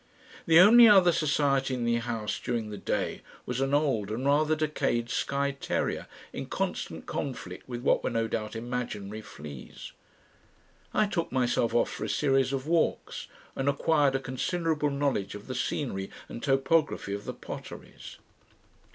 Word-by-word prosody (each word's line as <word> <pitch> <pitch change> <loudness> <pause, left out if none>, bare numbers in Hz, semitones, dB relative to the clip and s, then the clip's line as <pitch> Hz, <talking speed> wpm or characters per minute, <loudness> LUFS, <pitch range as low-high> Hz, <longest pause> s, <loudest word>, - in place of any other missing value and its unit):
The 165 0 +7
only 230 +5 +9
other 190 -4 +7
society 140 -4 +1
in 120 -1 -2
the 120 0 +2
house 115 -2 -3
during 115 -3 -3
the 105 - -6
day - - -2 0.2
was 125 +1 -2
an 135 0 0
old 135 -9 +1
and 115 +5 -3
rather 150 +2 +3
decayed 150 -6 -1
Skye 140 0 0
terrier 140 - -2 0.3
in - - -5
constant - - -3
conflict - - -5
with 120 -1 -5
what - - +3
were - - 0
no 115 0 0
doubt 110 0 -3
imaginary 115 -3 -4
fleas. 75 -8 -10 1.0
I 215 - +3
took 185 -5 -2
myself 120 -2 +1
off 120 - +2
for - - -5
a - - -3
series 135 -2 +2
of 135 -1 -2
walks, 165 +1 0 0.3
and 135 +1 0
acquired 145 -1 +2
a - - +1
considerable 150 +4 -1
knowledge 140 -9 -1
of 105 +1 -9
the 130 - -5
scenery 120 -5 -2 0.2
and 120 - -8
topography 135 -5 +1
of 100 +1 -5
the - - -4
Potteries. - - -9
135 Hz, 160 wpm, -28 LUFS, 115-150 Hz, 1.0 s, only